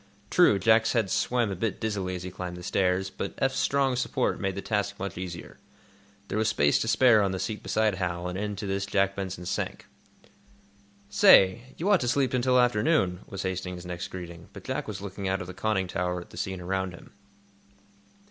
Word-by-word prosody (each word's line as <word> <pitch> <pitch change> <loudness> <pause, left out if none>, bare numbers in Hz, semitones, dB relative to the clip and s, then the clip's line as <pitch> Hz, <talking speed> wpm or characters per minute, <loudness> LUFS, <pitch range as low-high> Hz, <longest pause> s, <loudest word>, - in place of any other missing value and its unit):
True, 175 - +5
Jack's 110 +3 +3
head 110 -6 +1
swam 120 -4 +1
a - - -3
bit 105 +3 -2
dizzily 100 -5 -2
as 90 - -6
he 90 - -6
climbed 90 -1 -6
the 90 - -9
stairs, 95 +1 0
but - - -5
Eph's 135 -1 0
strong 135 -2 +2
support 125 - -1
made 95 -1 -2
the 100 - -4
task 105 -1 -1
much 100 -1 -5
easier. 90 -1 -7 0.7
There 105 - -2
was 110 - +1
space 70 0 +3
to - - -2
spare 115 -2 +5
on 100 -1 0
the - - -2
seat 105 +3 -4
beside 110 -1 +1
Hal, 90 -1 -3
and 90 - -4
into 105 +1 -3
this 100 0 -2
Jack 100 -1 +1
Benson 95 -2 -5
sank. - - -3 1.2
"Say, 100 +5 +5
you 175 - -2
ought 195 - +5
to 125 - -2
sleep 130 +1 +1
until 125 0 +3
afternoon," 115 - +2
was 100 - -5
Hastings's 90 -1 -4
next 90 -1 -5
greeting, 85 -2 -9
but - - -10
Jack - - -3
was 100 -2 -6
looking 100 -1 -5
out 95 0 0
of 90 - -5
the 90 - -8
conning 95 -1 -1
tower 90 0 -2
at 85 - -12
the - - -12
scene 95 0 -3
around 95 0 -2
him. - - -15
95 Hz, 205 wpm, -27 LUFS, 90-110 Hz, 1.2 s, True